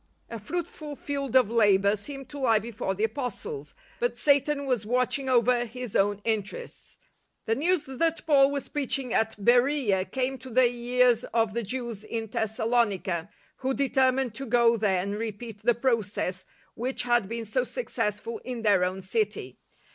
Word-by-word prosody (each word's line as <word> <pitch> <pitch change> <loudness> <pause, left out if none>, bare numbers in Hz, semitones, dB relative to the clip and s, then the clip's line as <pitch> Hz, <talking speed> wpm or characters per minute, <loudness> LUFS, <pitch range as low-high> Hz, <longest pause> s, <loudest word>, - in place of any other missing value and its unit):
A 230 - -5
fruitful 305 - -5
field 275 -3 -4
of 250 -5 +5
labour 205 -3 +4
seemed 275 +5 -7
to 290 - -8
lie 235 -5 +4
before 215 -3 -3
the 205 - -2
Apostles; 275 - -4 0.2
but 485 0 -1
Satan 285 0 +2
was 250 -6 0
watching 250 +4 0
over 245 -1 +3
his 245 -1 -7
own 205 +1 +2
interests. 220 - -4 0.5
The 225 - +1
news 330 +6 +1
that 320 +5 -1
Paul 280 -3 +5
was 280 -1 -3
preaching 270 -3 -1
at 220 0 +1
Beroea 240 -3 +3
came 265 0 -1
to 260 - -10
the 255 +1 +4
ears 245 0 +2
of 225 -2 0
the 235 - -1
Jews 235 -1 -4
in 225 0 -4
Thessalonica, 220 -5 0 0.3
who 265 0 -1
determined 265 -2 +2
to 270 +4 -5
go 235 0 +4
there 195 -5 +1
and 200 +2 -3
repeat 225 -1 -6
the 240 +1 +3
process 210 -7 -1 0.3
which 255 +3 -2
had 240 -5 +2
been 230 0 -4
so 235 +4 0
successful 230 - -3
in 245 -3 -5
their 200 -4 +4
own 185 +1 -2
city. 200 - -2
235 Hz, 160 wpm, -27 LUFS, 215-265 Hz, 0.5 s, of